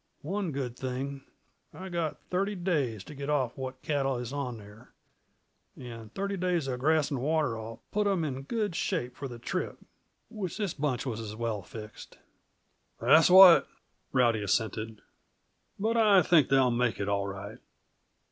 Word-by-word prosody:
One 190 +2 -2
good 130 -4 -4
thing 135 +2 -4 0.5
I 190 +1 -7
got 170 -3 -2
thirty 195 +3 0
days 145 - -1
t' - - -11
get 140 0 -6
off 130 -5 0
what 130 -1 -7
cattle 135 -3 0
is 120 +1 -5
on 130 -5 -3
there; 105 +3 -15 0.8
and 115 -3 -9
thirty 200 0 -2
days 175 -5 0
uh 130 - -1
grass 150 +4 +1
and 135 -4 -2
water'll 125 -7 -2
put 210 0 +1
'em 190 -4 +1
in 135 -3 -3
good 210 - -2
shape 160 -11 -2
for 140 - -5
the 120 -2 -8
trip. 120 - -3 0.5
Wish 200 -7 -5
this 205 -6 -2
bunch 140 -4 -2
was 115 -4 -3
as 110 -2 -6
well 110 -2 -2
fixed." 105 +4 -11 0.8
"That's 160 +2 +6
what," 185 -1 +9 0.4
Rowdy 120 -4 +3
assented. 110 +1 -2 0.7
"But 225 +3 0
I 205 -4 +6
think 155 -6 +4
they'll 135 -2 +4
make 120 -3 0
it, 100 - -2
all 100 -1 0
right." 100 +2 -7
135 Hz, 160 wpm, -29 LUFS, 115-170 Hz, 0.8 s, what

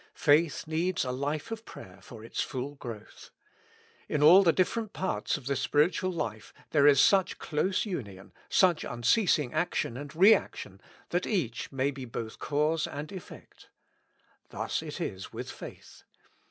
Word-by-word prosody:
Faith 150 +1 +3
needs 165 +1 -1
a 125 - -2
life 145 - -3
of 225 0 -5
prayer 95 - -12
for 110 +2 -12
its - - -3
full 135 +1 -4
growth. 115 -6 -10 0.8
In 150 -1 +1
all 175 +6 +9
the 175 -4 +5
different 210 +5 -1
parts 190 -3 -1
of 140 - -13
the 140 +1 0
spiritual 150 +7 +1
life 110 -11 -5 0.2
there 145 -2 +5
is 140 -2 +6
such 195 +3 +4
close 185 +7 -1
union, 100 - -6 0.2
such 180 -4 +3
unceasing 145 - +1
action 125 -8 -1
and 145 +2 -8
re 195 +6 +8
action, 100 - -4 0.3
that 175 +1 -1
each 140 - -2
may 135 +1 0
be 135 -2 -8
both 115 -2 -6
cause 150 +2 0
and 145 +2 -7
effect. 190 -3 -12 0.8
Thus - - -3
it - - -7
is 95 0 -5
with - - -6
faith. - - -11
150 Hz, 155 wpm, -29 LUFS, 125-180 Hz, 0.8 s, all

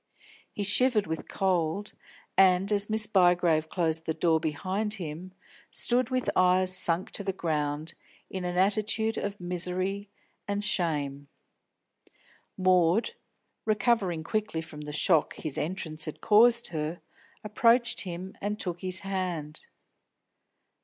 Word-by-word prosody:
He 205 - -4
shivered 215 +1 +3
with 160 0 -5
cold, 190 +1 -1 0.4
and, 190 +1 +4
as 205 0 +2
Miss 220 0 0
Bygrave 175 -5 +3
closed 160 -2 0
the 160 - -1
door 165 -2 +2
behind 185 +7 -1
him, 175 0 -7 0.4
stood 245 0 +1
with 255 -1 -1
eyes 185 0 +4
sunk 175 0 +2
to 200 - -4
the 195 - -1
ground, 155 -2 -2 0.3
in 190 -1 -5
an 180 0 -3
attitude 215 +3 +1
of 200 0 -4
misery 185 +3 -2 0.4
and 200 0 -2
shame. 145 -9 0 1.3
Maud, 185 - +3 0.5
recovering 205 -6 +1
quickly 215 -1 -2
from 160 -2 -10
the 150 0 -7
shock 155 +1 +2
his 155 -3 -5
entrance 160 -2 -3
had 155 - -7
caused 235 +2 +4
her, 160 0 -4 0.4
approached 230 +3 +3
him 185 0 -6
and 210 +1 -3
took 175 -2 -3
his 185 0 -2
hand. 180 -6 -3
185 Hz, 125 wpm, -28 LUFS, 160-205 Hz, 1.3 s, and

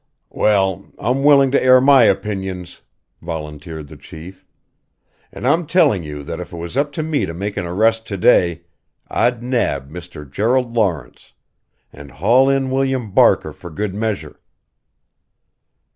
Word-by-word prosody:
"Well 95 -3 0
I'm 125 +6 -1
willing 140 -2 +5
to 140 - +2
air 130 0 +6
my 135 -2 +6
opinions," 95 -3 -2 0.4
volunteered 80 -1 -7
the - - -13
Chief. 85 +4 -12 0.9
"And - - -8
I'm 165 -1 +2
telling 125 - +3
you 75 -2 -7
that 80 +3 -6
if 90 - -8
it 85 - -8
was 85 +5 -7
up 145 +2 0
to 155 - -3
me 155 -2 -1
to 80 - -6
make 100 +3 -4
an 85 - -3
arrest 110 +5 +1
to 100 - -4
day 85 -4 +3 0.5
I'd 120 -1 0
nab 120 - -1
Mr. 85 -3 -10
Gerald 120 - 0
Lawrence 85 - -2 0.6
and 70 0 -12
haul 120 - +3
in 135 -1 0
William 130 -4 -1
Barker - - +3
for 85 - -11
good 95 +5 -4
measure." 110 0 -4
100 Hz, 150 wpm, -19 LUFS, 85-130 Hz, 0.9 s, air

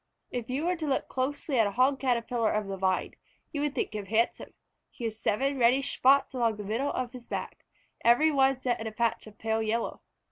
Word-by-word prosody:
If 245 -2 -4
you 275 +5 -1
were 360 +1 +1
to 315 -2 -3
look 270 - 0
closely 265 0 -1
at 220 - +5
a - - -2
Hog 265 +3 +3
Caterpillar 235 -3 +1
of 215 -1 0
the 195 0 -4
Vine, 190 -1 0 0.4
you 290 - -3
would 295 -1 -1
think - - -2
him 205 -2 -5
handsome. 225 +3 0 0.3
He 245 - -11
has 220 -1 -3
seven 270 +7 0
reddish 255 +3 +3
spots 275 +2 +4
along 235 -3 +1
the 210 - -6
middle 230 +8 -1
of 250 0 -3
his 245 -2 -10
back, - - -5 0.4
every 245 +7 +5
one 270 -2 +3
set 245 -3 -1
in 225 - -3
a - - -4
patch 230 0 -1
of 210 -1 -14
pale 225 0 -1
yellow. 225 +1 -2
240 Hz, 220 wpm, -29 LUFS, 220-270 Hz, 0.4 s, at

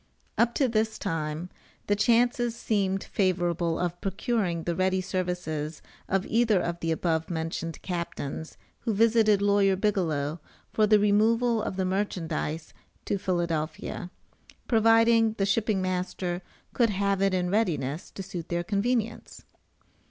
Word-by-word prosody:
Up 235 0 +2
to 270 - +3
this 220 -1 0
time 160 -1 -3 0.4
the 205 - +2
chances 240 +2 +2
seemed 195 -4 0
favorable 175 -3 0
of 175 0 -2
procuring 195 -4 -1
the 170 - -1
ready 185 +1 +1
services 180 -5 -3 0.3
of 195 0 +1
either 225 -4 +3
of 170 -1 -3
the 165 - -1
above 160 0 0
mentioned 165 -1 -3
captains 170 -4 -5 0.2
who 225 -4 -2
visited 215 -2 +4
Lawyer 200 -1 +4
Bigelow 170 -7 0 0.3
for 215 -1 +3
the 215 0 +6
removal 220 +3 +3
of 200 - -3
the 190 0 0
merchandize 165 -5 -2 0.3
to 200 - -1
Philadelphia, 170 -2 -2 0.6
providing 225 0 +4
the 200 -3 0
shipping 200 -1 +1
master 180 -1 -2 0.3
could 235 -2 +3
have 200 -1 0
it 195 -1 +3
in 180 -1 0
readiness 160 -8 -1
to 195 - -7
suit 180 -3 -7
their 175 0 -1
convenience. 225 +4 -2
190 Hz, 135 wpm, -27 LUFS, 170-215 Hz, 0.6 s, the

